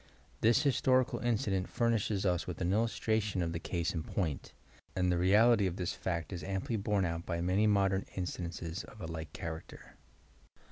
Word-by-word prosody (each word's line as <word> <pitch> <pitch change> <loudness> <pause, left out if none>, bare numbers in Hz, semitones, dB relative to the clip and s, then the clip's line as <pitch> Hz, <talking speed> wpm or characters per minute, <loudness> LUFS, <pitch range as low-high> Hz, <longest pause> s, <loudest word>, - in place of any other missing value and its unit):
This 120 +6 +4
historical 130 -2 +2
incident 100 -6 0
furnishes 110 -4 +1
us 90 -2 +1
with 90 - -5
an 90 +1 +1
illustration 110 -3 +1
of 85 0 -2
the 85 - -2
case 85 0 -2
in 80 - -2
point, 80 -3 -3 0.4
and 90 -1 +2
the 90 - +2
reality 105 +3 +5
of 90 - -3
this 90 -2 -2
fact 85 0 -3
is 85 -3 -5
amply 95 +5 -2
borne 100 -2 +1
out 85 0 -2
by 85 -1 -3
many 95 +5 +2
modern 100 -2 +2
instances 85 -2 -4
of 105 - -14
a 85 - -5
like 80 -2 -6
character. 80 -1 -8
95 Hz, 175 wpm, -33 LUFS, 85-105 Hz, 0.4 s, reality